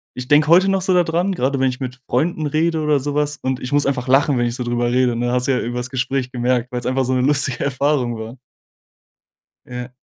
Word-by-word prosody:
ich 125 0 -6
denke 150 +2 +4
heute 180 +4 +5
noch 195 -1 +1
so 190 - +1
da 180 -1 +4
dran, 175 +4 0
grade 135 -4 -1
wenn 130 0 +2
ich 125 - -6 0.3
Freunden 155 +5 0
rede 160 +2 0
oder 150 -2 +2
so 145 +2 -4
was 150 0 -1
und 130 -2 -3
ich 125 - -6
muss 145 0 +2
einfach 130 -2 -2
lachen, 135 +1 +3
wenn 120 - +1
ich 120 0 -2
so 125 - -4
drüber 120 0 -1
rede, 125 -1 +2
ne? 120 +1 -1
Hast 125 0 0
du - - +2
ja 130 - +1
übers 120 +1 -4
Gespräch 130 0 -2
gemerkt, 125 0 -1
weil's 125 -1 -4
einfach 130 +1 0
so 130 - -1
'ne 130 - +1
lustige 140 -1 +1
Erfahrung 140 -3 0
war. 110 +3 -8 1.3
Ja. 125 0 -7
130 Hz, 240 wpm, -19 LUFS, 125-145 Hz, 1.3 s, heute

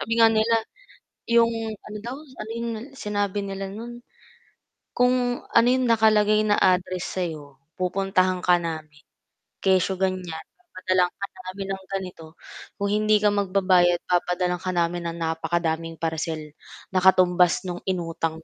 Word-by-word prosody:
Sabi 225 - -4
nga 225 0 +8
nila, 225 +1 +3 0.7
yung 235 0 +5 0.3
ano 210 +2 -9
daw, 240 +3 -5
ano 260 -7 -10
yung 235 0 -3 0.3
sinabi 205 -2 -2
nila 195 0 -5
nun, 235 +4 -8 0.9
kung 250 0 +2
ano 230 0 +5
yung 255 +1 +3
nakalagay 215 -1 +4
na 205 - +2
address 185 0 +1
sayo, 150 -6 -5 0.2
"Pupuntahan 185 0 +1
ka 175 -1 +4
namin 155 -3 -6 0.6
kesyo 190 0 +3
ganyan 185 -1 -1 0.3
papadalhan 185 - 0
ka 200 - -5 0.2
namin 195 +1 -5
ng 190 0 -5
ganito 180 -4 -6 0.4
kung 200 0 -2
hindi 215 0 +3
ka 210 - +5
magbabayad 185 -3 +2
papadalhan 180 0 0
ka 185 -1 -3
namin 170 0 0
ng 165 - -4
napakadaming 165 0 -2
parcel, 160 -1 -3 0.4
na 185 - +2
katumbas 180 -1 +4
nung 180 -1 -5
inutang 165 -3 -2
185 Hz, 135 wpm, -24 LUFS, 175-210 Hz, 0.9 s, nga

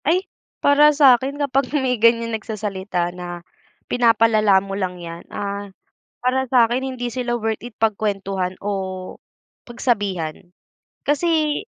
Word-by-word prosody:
Ay, 360 +6 +2 0.4
para 290 +1 +7
sa'kin 275 -2 +4
kapag 275 -2 0
may 250 -4 0
ganiyan 230 0 +3
nagsasalita 200 -5 -3
na, 175 -1 -7 0.4
"pinapalala 225 -4 +4
mo 195 0 -2
lang 185 -2 -3
yan" 170 -1 -8
ah, 200 0 -4 0.5
para 255 +1 +1
sa'kin 245 +1 +3
hindi 255 -2 -3
sila 245 0 -3
worth 220 0 -2
it 240 - -8
pagkwentuhan 195 -4 -1
o 190 -2 -4 0.5
pagsabihan 195 - -2 0.5
kasi 305 0 +1
225 Hz, 120 wpm, -21 LUFS, 195-255 Hz, 0.5 s, para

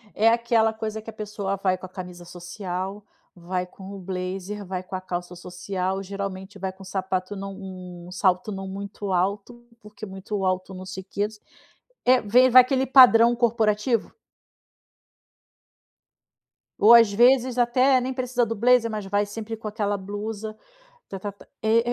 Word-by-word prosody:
É 220 +2 +5
aquela 230 -1 +2
coisa 220 0 -5
que 220 - -10
a - - -8
pessoa 210 -2 -4
vai 190 -1 0
com 185 - -10
a - - -24
camisa 180 -1 -9
social, 180 +3 -6 0.3
vai 180 +1 -3
com 190 +2 -11
o - - -8
blazer, 190 +2 -5
vai 185 -1 -5
com 185 - -7
a 185 - -4
calça 175 -1 -5
social, 185 +2 -4
geralmente 195 0 -6
vai 190 0 -3
com 190 +1 -15
um - - -12
sapato 185 +1 -3
não 195 0 -6
um 180 -2 -9
salto 185 +2 +1
não 195 -1 -5
muito 200 +1 -6
alto, 200 +6 -1 0.2
porque 210 0 -10
muito 195 0 -4
alto 185 +1 -1
não 185 0 -8
sei 190 0 -7
que 200 +2 -2 0.8
é, 255 0 +5
vem 245 +5 +5
vai 255 +1 +10
aquele 260 +1 0
padrão 240 -3 +7
corporativo. 225 -1 +1 2.7
Ou, 220 +3 +8
às 230 -3 +7
vezes, 250 +3 +4
até, 255 +2 +4
nem 260 +1 -3
precisa 250 -1 0
do 230 0 -3
blazer, 235 +1 +4
mas 215 -2 -4
vai 205 +1 +1
sempre 220 +2 -6
com 220 0 -8
aquela 205 -1 -1
blusa, 210 +2 -6 0.5
ta 195 - -6
ta 205 +1 -5
ta 200 - -18 0.2
e 220 +1 +4
200 Hz, 165 wpm, -24 LUFS, 185-225 Hz, 2.7 s, vai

